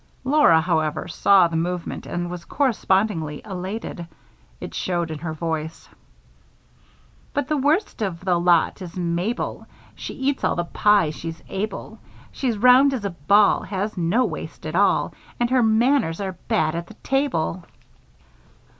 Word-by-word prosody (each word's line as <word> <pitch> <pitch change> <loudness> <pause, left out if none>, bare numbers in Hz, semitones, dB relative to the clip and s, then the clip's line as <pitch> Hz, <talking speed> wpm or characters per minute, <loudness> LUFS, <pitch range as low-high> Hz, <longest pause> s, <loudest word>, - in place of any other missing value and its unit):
Laura, 260 - +5
however, 160 -3 -1
saw 195 -3 +4
the 165 - -5
movement 175 +1 -3
and 175 0 -3
was 175 -1 -6
correspondingly 195 - 0
elated. 190 -2 -5 0.5
It - - -7
showed 175 -3 -2
in 155 - -5
her 160 +1 -4
voice: 160 0 -4 1.5
But 285 - 0
the 305 0 0
worst 295 - 0
of 185 -3 -3
the 180 -2 +2
lot 175 +1 +2
is 180 0 -8
Mabel, 175 +6 -2 0.3
She - - -7
eats 270 +1 -1
all - - +2
the 175 - -1
pie 205 -3 +3
she's 165 +1 -7
able. 205 +3 -5 0.3
She's 245 -5 -2
round 255 +4 +6
as 220 -5 -5
a 200 - -1
ball, 200 +6 +3
Has 205 +2 -3
no 185 +8 +1
waist 160 -5 -7
at 155 +1 -4
all, 200 +2 +2 0.3
And 240 0 0
her 255 -1 +4
manners 225 - +2
are 190 -2 -4
bad 155 0 +1
at 170 0 -4
the 220 - -13
table. 255 - -1
185 Hz, 150 wpm, -23 LUFS, 170-225 Hz, 1.5 s, round